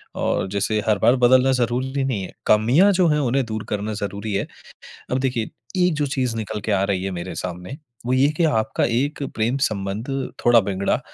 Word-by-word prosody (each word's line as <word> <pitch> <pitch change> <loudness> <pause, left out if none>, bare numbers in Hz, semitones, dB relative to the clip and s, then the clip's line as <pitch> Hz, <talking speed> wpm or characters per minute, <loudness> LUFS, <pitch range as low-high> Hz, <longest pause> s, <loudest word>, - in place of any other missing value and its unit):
और - - -1
जैसे 100 +2 -1
हर 105 -2 +3
बार 120 - +4
बदलना 130 +2 +5
ज़रूरी 130 +3 -1
नहीं 130 -7 -1
है। 90 - -8
कमियाँ 125 - +4
जो 180 -2 +3
हैं 150 0 +2
उन्हें 135 -1 +1
दूर 110 -1 -4
करना 105 +1 -2
ज़रूरी 100 +1 -4
है। 100 - 0 0.7
अब 130 - +1
देखिए, 125 -4 -1 0.3
एक 180 -1 +3
जो 150 -1 0
चीज़ 130 -4 -1
निकल 110 -1 -4
के 110 - -2
आ 100 -1 +2
रही 100 -2 -1
है 95 - -2
मेरे 90 +2 -6
सामने, 90 +8 -6 0.3
वो 125 - 0
ये 130 +1 +4
है - - 0
कि 170 - +2
आपका 110 -9 +1
एक 135 +5 -1
प्रेम 115 +4 0
संबंध 100 +2 -4 0.4
थोड़ा 120 -1 +7
बिगड़ा 100 0 -1
115 Hz, 205 wpm, -22 LUFS, 100-130 Hz, 0.7 s, थोड़ा